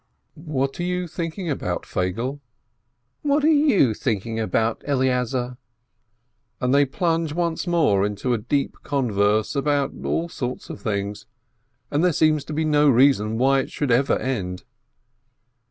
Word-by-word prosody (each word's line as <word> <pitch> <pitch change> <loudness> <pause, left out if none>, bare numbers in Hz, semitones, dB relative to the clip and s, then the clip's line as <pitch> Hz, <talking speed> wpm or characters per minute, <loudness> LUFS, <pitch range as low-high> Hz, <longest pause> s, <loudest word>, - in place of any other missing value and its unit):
"What 145 -4 -3
are - - -1
you 180 0 -1
thinking 170 +2 -5
about, 90 - -2
Feigele 115 +10 -2 0.4
?" 120 +1 -50
"What 290 0 +1
are - - +4 0.3
you 125 - +4
thinking 110 0 -2
about, 110 +1 0
Eleazar 125 -2 0 0.5
?" 110 +1 -49
And 125 +1 +1
they 140 0 +5
plunge 165 0 -1
once 170 +1 -1
more 150 - +3
into 105 +5 -1
a 115 - 0
deep 135 +6 -1
converse 110 -5 +1
about 140 0 0
all 170 - -1
sorts 125 -6 -5
of - - -9
things, 100 +1 -3 0.6
and 145 +3 +1
there 180 -2 +3
seems 155 -1 +2
to 155 - -6
be 155 +1 0
no 150 -1 +4
reason 120 -4 +3
why 135 +2 +3
it 130 - -3
should 145 -4 -2
ever 130 +4 +3
end. 95 -8 -3
130 Hz, 155 wpm, -23 LUFS, 110-150 Hz, 0.6 s, they